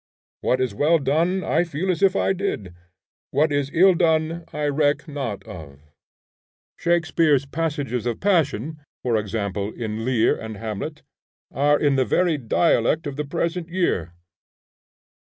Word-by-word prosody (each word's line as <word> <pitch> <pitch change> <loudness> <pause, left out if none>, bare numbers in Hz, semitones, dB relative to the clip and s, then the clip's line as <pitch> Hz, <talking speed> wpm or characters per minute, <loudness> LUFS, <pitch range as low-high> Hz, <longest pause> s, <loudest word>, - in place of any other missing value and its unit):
What 130 - +1
is 130 -4 0
well 150 +10 +3
done 165 +7 +1
I 165 +3 +2
feel 170 +3 -2
as 180 - -3
if 195 -1 +4
I 195 - +2
did; 175 - -3 0.6
what 155 +1 +2
is 145 -1 0
ill 185 +3 +6
done 165 -1 +1
I 150 0 -2
reck 145 +1 +1
not 135 -9 -4
of. 70 -5 -10 1.0
Shakspeare's 165 -4 +2
passages 140 -6 -2
of 120 - -2
passion 155 - 0 0.2
(for 120 -2 +1
example, 100 -1 -2
in 110 -1 -4
Lear 120 -2 +2
and 110 -2 -7
Hamlet) 105 -2 -5 0.5
are 145 +2 +3
in 145 -2 +2
the 130 - +4
very 170 +2 +1
dialect 160 +5 +2
of 145 -2 -4
the 150 +1 -3
present 170 +3 -2
year. 130 - -1
145 Hz, 145 wpm, -23 LUFS, 120-165 Hz, 1.0 s, ill